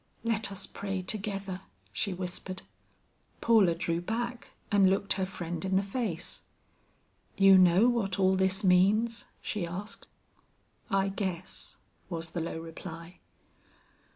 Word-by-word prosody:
"Let 225 -3 +1
us 195 0 -4
pray 195 -2 -4
together," 195 -2 -3 0.3
she 195 - -1
whispered. 185 +1 -5 0.8
Paula 210 -7 +5
drew 170 0 -1
back 235 +5 -3 0.2
and 200 -2 +6
looked 195 +1 +1
her 190 -1 -1
friend 175 -3 -5
in 190 0 0
the 195 - +3
face. 200 -4 -3 1.0
"You 195 0 +8
know 185 +5 +6
what 220 -7 +1
all 190 -1 +4
this 190 +2 +1
means?" 205 +5 +3 0.2
she 210 -4 -2
asked. 205 +6 -7 0.8
"I 195 0 +2
guess," 185 -3 -3 0.3
was 165 -2 -4
the 175 - -2
low 160 0 -3
reply. 165 +1 -9
190 Hz, 125 wpm, -30 LUFS, 180-205 Hz, 1.0 s, You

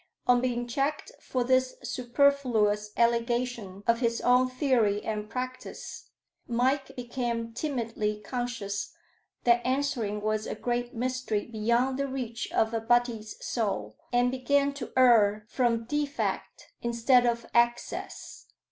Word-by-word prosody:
On 245 -1 +4
being 245 -1 -1
checked 275 +5 -1
for 255 -1 -2
this 255 +1 +2
superfluous 240 -5 +2
allegation 235 -4 0
of 230 0 +3
his 235 -2 +1
own 250 +1 +4
theory 245 -6 +1
and 210 -1 -3
practice, 255 +1 -6 0.4
Mike 260 +4 0
became 235 -2 -3
timidly 230 -6 -2
conscious 220 -3 -4 0.5
that 240 0 +4
answering 255 -5 0
was 215 0 -1
a - - -3
great 240 +2 -2
mystery 250 -3 -1
beyond 235 +4 0
the 275 - 0
reach 250 -4 -4
of 220 +1 +1
a 225 - 0
butty's 230 -2 +1
soul, 195 - -2 0.2
and 245 0 +3
began 280 +2 +1
to 280 -4 -7
err 215 -5 +5
from 230 -1 +1
defect 290 +3 -3
instead 240 +1 +3
of 235 -1 0
excess. 240 0 -1
240 Hz, 125 wpm, -28 LUFS, 225-255 Hz, 0.5 s, err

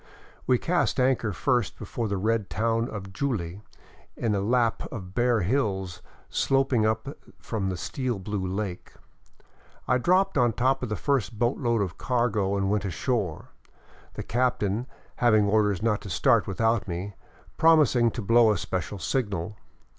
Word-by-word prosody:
We 125 - +4
cast 175 0 0
anchor 125 -4 +2
first 120 - 0
before 115 -2 -4
the 100 -1 -2
red 110 +1 0
town 115 +2 0
of 95 -2 -7
Juli, 100 -8 -3 0.6
in 115 -3 0
a 100 - +1
lap 115 +2 0
of 95 -7 -7
bare 120 0 +2
hills 95 -4 -1 0.3
sloping 135 -5 +2
up 110 +6 -2 0.2
from 100 -4 -3
the 95 - -3
steel 125 +3 -3
blue 100 +1 -4
lake. 95 -1 -4 0.9
I 125 - +3
dropped 185 +8 +2
on 120 -2 +3
top 130 +4 +1
of 125 - -3
the 105 - -1
first 120 -4 -1
boatload 120 -1 +1
of 90 -3 -6
cargo 110 -6 0
and 95 0 0
went 105 0 0
ashore, 100 - -2 0.7
the - - -5
captain, 120 -2 0 0.3
having 110 -4 +4
orders 105 -2 +2
not 105 -3 +1
to 100 - -8
start 85 - +3
without 110 0 0
me, 95 +3 -4 0.4
promising 150 -7 +5
to 115 - -5
blow 115 +2 +5
a 105 - +1
special 95 +3 -4
signal. 100 -2 -2
110 Hz, 155 wpm, -26 LUFS, 100-125 Hz, 0.9 s, promising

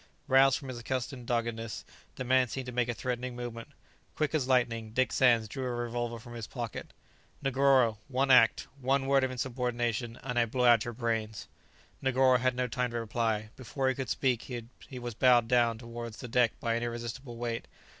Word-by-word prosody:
Roused 135 0 +5
from 135 - -9
his 125 -2 -5
accustomed 125 0 -4
doggedness, 115 -2 -2 0.3
the - - -4
man 130 0 +3
seemed 130 +2 -5
to 125 - -6
make 120 0 0
a - - 0
threatening 125 0 -3
movement. 120 -1 -6 0.5
Quick 155 -1 0
as 145 -5 +1
lightning, 115 -4 +1
Dick 130 +2 +2
Sands 120 -4 +4
drew 130 +5 -5
a - - -1
revolver 120 0 -3
from 120 +1 -11
his 115 -3 -6
pocket. 120 -4 -6 0.5
"Negoro, 135 -4 +3
one 135 0 +1
act, 115 -3 +6
one 135 +1 +1
word 135 0 +3
of 130 - +1
insubordination, 120 -2 -2
and 125 -2 -1
I 120 - +3
blow 125 +2 0
out 120 -2 +6
your 120 -1 -5
brains!" 110 -3 -2 0.5
Negoro 130 -1 +4
had 130 0 +1
no 125 0 0
time 125 0 -1
to 120 0 -3
reply; 110 -1 -1
before 130 +1 -2
he - - +1
could 130 -2 -5
speak 130 -3 0 0.4
he 130 - -7
was 120 -1 -5
bowed 120 0 +4
down 120 -2 +3
towards 115 -1 -7
the 125 - -7
deck 120 -1 +2
by 115 - 0
an 115 - -1
irresistible 120 +1 -5
weight. 115 -1 -3
120 Hz, 195 wpm, -30 LUFS, 115-130 Hz, 0.5 s, act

